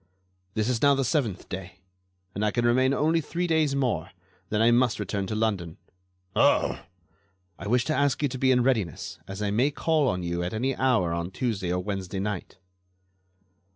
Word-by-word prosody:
"This 110 0 0
is 125 -2 0
now 140 -1 +5
the 135 -1 0
seventh 120 - -1
day, 95 0 -7 0.6
and 100 - -2
I 105 - +3
can 120 +2 0
remain 130 +3 +3
only 160 +4 +2
three 175 +3 -2
days 160 -4 +2
more. 115 - 0 0.4
Then 105 - 0
I 115 +1 +5
must 120 0 +3
return 100 -1 -2
to 110 - -3
London." 100 -7 -1 0.6
"Oh!" - - +3 0.8
"I - - -6
wish 125 +3 +2
to 155 - 0
ask 140 0 +1
you - - +4
to 130 - -6
be 130 - +3
in 125 -1 +4
readiness, 110 - -1
as 95 +2 -5
I 100 - 0
may 125 +7 +3
call 155 -1 +1
on 90 -6 -1
you 85 0 -2
at 90 +4 -3
any 130 +4 0
hour 115 -11 +2
on 85 +1 -2
Tuesday 95 -4 -2
or 90 0 -1
Wednesday 95 -1 -4
night." 100 -2 -4
115 Hz, 190 wpm, -26 LUFS, 95-130 Hz, 0.8 s, now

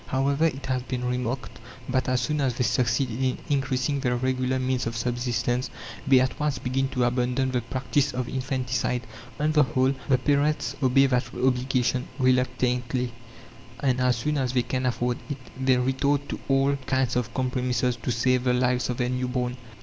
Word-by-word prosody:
However, 140 +3 +1
it 135 -3 -4
has 130 -1 0
been 125 0 -4
remarked 125 +1 -3 0.3
that 130 0 0
as 130 -1 +2
soon 150 +4 0
as 130 -3 +1
they 125 - 0
succeed 120 +2 +1
in 130 +2 -1
increasing 135 0 0
their 125 -3 0
regular 130 +1 0
means 130 -1 0
of 115 -1 -3
subsistence, 120 +1 -1 0.4
they 135 -1 +7
at 130 0 0
once 150 -3 0
begin 130 +1 -1
to 125 -2 0
abandon 125 +2 +1
the 125 -1 0
practice 130 +4 0
of 125 -1 -3
infanticide. 130 -2 -1 0.4
On 150 +1 +2
the 155 -1 +5
whole, 130 -1 +2 0.2
the 130 - +5
parents 145 +3 +1
obey 135 +1 +5
that 125 -2 +1
obligation 125 -1 +1
reluctantly, 125 -1 +1 0.7
and 130 -1 +1
as 125 -1 +3
soon 145 +6 -1
as 130 -2 -1
they 125 -2 +2
can 130 +1 -1
afford 125 0 -1
it 145 - -3 0.3
they 130 -1 +4
resort 140 +3 +1
to - - -4
all 135 +1 +3
kinds 130 -2 +1
of 120 -2 -1
compromises 125 -1 0
to 120 - -5
save 125 +2 +1
the 125 - +3
lives 125 0 +1
of 125 - -2
their 125 -1 0
new 125 0 -1
born. 125 -1 -1
130 Hz, 180 wpm, -26 LUFS, 125-135 Hz, 0.7 s, they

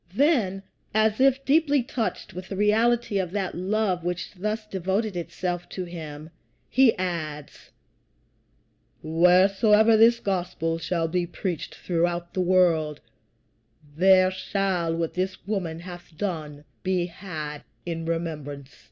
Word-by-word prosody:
Then, 220 - +2 0.3
as 220 0 +3
if 270 0 +3
deeply 290 -2 +3
touched 230 -4 -3
with 185 +1 -7
the 195 - -4
reality 220 +1 +2
of 185 -2 -1
that 195 -3 -2
love 190 -1 0
which 175 0 -3
thus 215 +3 -3
devoted 195 +1 -2
itself 175 +1 -4
to 185 - -4
him, 160 -3 -8 0.4
he 255 -4 +5
adds, 155 -5 -5 1.3
"Wheresoever 195 +7 +5
this 230 +2 +6
gospel 175 -5 -2
shall 165 0 -1
be 175 +1 -1
preached 175 -1 -4
throughout 175 0 -1
the 185 - 0
world, 170 -5 +2 1.0
there 185 +2 +5
shall 185 -3 -1
what 165 -1 -2
this 185 0 -3
woman 180 -6 -3
hath 175 -2 -11
done 155 -7 -4 0.2
be 185 -2 0
had 155 -5 -6 0.2
in 165 -1 -4
remembrance." 150 -4 -4
185 Hz, 125 wpm, -25 LUFS, 165-205 Hz, 1.3 s, this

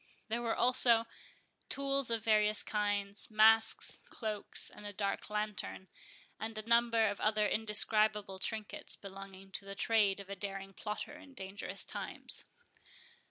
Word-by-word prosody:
There 235 +2 -1
were 230 -1 -1
also 240 -2 +5 0.6
tools 275 -2 +1
of 230 -2 -1
various 215 -1 +3
kinds, 205 -1 -1
masks, 220 +1 +4
cloaks, 215 -3 -1
and - - -13
a - - -5
dark 200 0 -3
lantern, 210 -3 -3 0.5
and 220 +1 -5
a 215 +1 -6
number 235 -1 +4
of 205 -1 -3
other 215 0 +2
indescribable 210 -2 +2
trinkets 215 +1 -3
belonging 195 -1 -11
to 195 - -1
the 195 0 -8
trade 205 -2 +2
of 200 - -9
a 200 - -6
daring 195 0 -6
plotter 210 +8 -5
in 280 -3 -16
dangerous 195 -1 -4
times. - - -4
210 Hz, 140 wpm, -33 LUFS, 200-225 Hz, 0.6 s, also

